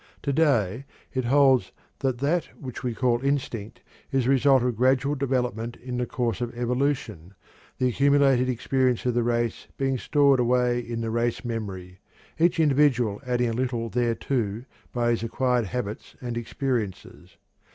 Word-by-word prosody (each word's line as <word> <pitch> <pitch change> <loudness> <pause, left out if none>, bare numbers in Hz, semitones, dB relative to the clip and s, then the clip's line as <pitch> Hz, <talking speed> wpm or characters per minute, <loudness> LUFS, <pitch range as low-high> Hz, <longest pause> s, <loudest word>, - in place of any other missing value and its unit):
To 140 - 0
day 130 - +2 0.3
it 130 -1 -1
holds 135 0 +4 0.3
that 130 -3 0
that 150 +7 0
which 130 -4 -7
we 120 -2 -2
call 120 -1 +1
"instinct" 125 -5 -2 0.3
is 135 -2 +2
the 130 - +2
result 135 -1 +4
of 125 -2 0
gradual 130 +4 +2
development 125 -4 -2
in 125 0 -6
the 125 0 -1
course 120 -5 -2
of 120 -1 -2
evolution, 120 - -2 0.4
the 130 - +2
accumulated 135 -1 +3
experience 125 0 0
of 125 - +1
the 120 - +2
race 120 -1 -1
being 135 -1 0
stored 140 -1 +3
away 125 0 +2
in 115 -1 -4
the 115 -1 -2
race 120 +1 -1
memory, 95 -6 -5 0.4
each 170 0 +3
individual 135 -8 +3
adding 125 -1 +1
a - - -2
little 120 -2 -2
thereto 120 -2 -1 0.3
by 120 -1 +1
his 115 - 0
acquired 120 +1 0
habits 105 +1 -5
and 120 -3 -5
experiences. 120 -4 -4
125 Hz, 155 wpm, -25 LUFS, 115-135 Hz, 0.4 s, holds